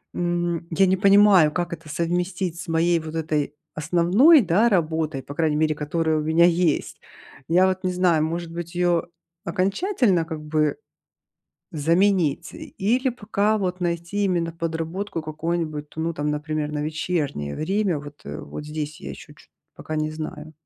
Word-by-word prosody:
м, 175 -1 -1
я 165 +4 +4
не 190 - +2
понимаю 200 -5 +6
как 175 +1 -2
это 165 -2 -10
совместить 175 +2 -2
с 175 - -7
моей 165 +1 +2
вот 160 0 -7
этой 150 -2 -1 0.2
основной, 180 - +5
да, 205 +4 +3
работой, 160 -6 0
по 140 - -8
крайней 155 -1 +1
мере 155 0 +2
которая 155 +1 0
у - - 0
меня 160 +3 +4
есть. 170 -3 +1 0.5
Я 180 +3 +4
вот 185 0 -2
не 185 - 0
знаю 180 -4 +2
может 165 +1 -3
быть 170 +1 -7
её 175 -1 +2 0.4
окончательно 195 - +1
как 160 -2 -6
бы 150 0 0 1.0
заменить 165 0 +1
и - - -9
или 245 +7 +2
пока 215 -2 0
вот 185 -2 -2
найти 170 +3 -1
именно 170 -3 0
подработку 165 +2 -4
какую-нибудь, 155 -1 -3
ну 165 +1 -1
там 150 -1 -2
например 150 0 -2
на 150 -1 -2
вечернее 150 - -2
время. 190 0 0
Вот, 145 0 -11
э, - - -6
вот 150 - -8
здесь 150 0 -5
я 70 - -7
ещё 65 - -11
чёт - - -21 0.3
пока 155 - -6
не 155 0 -1
знаю. 155 0 -7
165 Hz, 165 wpm, -23 LUFS, 155-180 Hz, 1.0 s, понимаю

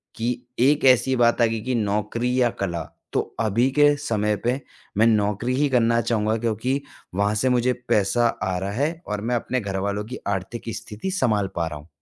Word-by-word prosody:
कि 120 +1 -2
एक 145 +3 +3
ऐसी 130 +1 +5
बात 120 0 +3
आ - - +7
गई 115 -1 -1
कि 125 +2 -1
नौकरी 115 +4 0
या 120 - +4
कला, 85 -4 -2 0.3
तो - - +2 0.2
अभी 115 +4 +2
के 145 +1 +5
समय 105 -7 0
पे 125 +3 +1 0.4
मैं 115 +2 +5
नौकरी 105 +3 +1
ही 145 +1 +2
करना 115 -2 +3
चाहूँगा 110 -1 0
क्योंकि 120 +5 -1 0.3
वहाँ 100 +1 +2
से 130 +5 +1
मुझे 125 0 +2 0.2
पैसा 105 +4 +3 0.2
आ 95 -1 -1
रहा 100 +2 -3
है 155 +9 -1
और 105 -1 -3
मैं 120 +2 0
अपने 125 +1 -1
घरवालों 100 +1 -2
की 125 +3 -7
आर्थिक 100 +4 -3
स्थिति 110 - -5
सँभाल 105 - +1
पा 85 -1 0
रहा 75 -2 -6
हूँ। 75 - -16
115 Hz, 195 wpm, -23 LUFS, 105-125 Hz, 0.4 s, आ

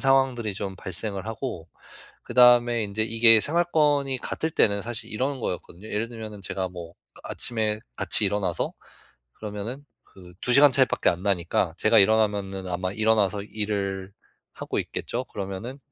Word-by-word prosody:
상황들이 130 -5 +2
좀 95 -1 -5
발생을 95 +2 -3
하고 115 -7 -5 0.6
그다음에 120 -1 +5
인제 105 +2 -1
이게 115 0 +7
생활권이 150 -3 +1
같을 160 +5 -3
때는 100 -8 +2
사실 115 -1 -7
이런 130 +4 -2
거였거든요. 90 0 -6
예를 110 +2 -2
들면은 110 -3 -8
제가 95 0 -3
뭐 85 -1 -10 0.3
아 - - -7
아침에 110 -2 0 0.2
같이 - - +3
일어나서 95 -4 -1 0.6
그러면은 110 +6 -7 0.2
그 90 -2 -16
2 125 - 0
시간 140 +1 +7
차이밖에 130 -1 +2
안 90 +1 -5
나니까 90 -4 0
제가 110 +1 +4
일어나면은 100 -2 +1
아마 90 +1 -2
일어나서 105 -2 +1
일을 100 -2 -3 0.4
하고 - - -4
있겠죠. 125 +2 -4
그러면은 100 +7 -6
110 Hz, 345 characters per minute, -25 LUFS, 95-120 Hz, 0.6 s, 이게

